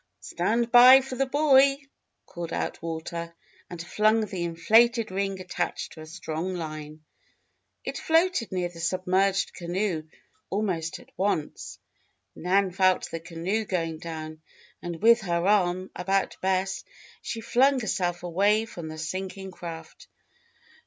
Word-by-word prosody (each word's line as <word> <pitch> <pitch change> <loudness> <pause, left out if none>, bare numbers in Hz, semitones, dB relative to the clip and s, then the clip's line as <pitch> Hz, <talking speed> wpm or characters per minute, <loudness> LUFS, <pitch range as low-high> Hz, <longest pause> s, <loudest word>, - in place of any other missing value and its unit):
"Stand 230 +7 -1
by 250 +2 +9
for 265 0 -8
the 270 +1 0
buoy!" 275 -1 +4 0.4
called 170 -1 -7
out - - -3
Walter, 170 +1 -5 0.3
and 175 - -8
flung 215 +6 +2
the 195 -4 -4
inflated 220 +7 +3
ring 195 0 -2
attached 185 -1 -3
to 160 - -11
a 155 - -10
strong 170 +1 -4
line. 155 -2 -7 0.8
It - - -4
floated 325 - +2
near 180 -2 -1
the 170 -1 -13
submerged 185 +3 +1
canoe 175 -2 -2 0.4
almost 185 -5 -2
at - - -18
once. 185 -5 -2 0.6
Nan 190 +2 +1
felt 185 0 +2
the 165 - -4
canoe 170 +6 -2
going 165 -5 -2
down, 155 -1 -7 0.4
and 175 +2 -6
with 230 0 +6
her 170 -2 -1
arm 185 -2 +2
about 195 +1 0
Bess, 190 +1 0 0.4
she 230 - -5
flung 260 +4 +3
herself 180 -5 -2
away 200 +5 +2
from 170 -7 -8
the 155 0 -7
sinking 190 +4 -5
craft. 165 -3 -9
185 Hz, 135 wpm, -26 LUFS, 170-215 Hz, 0.8 s, by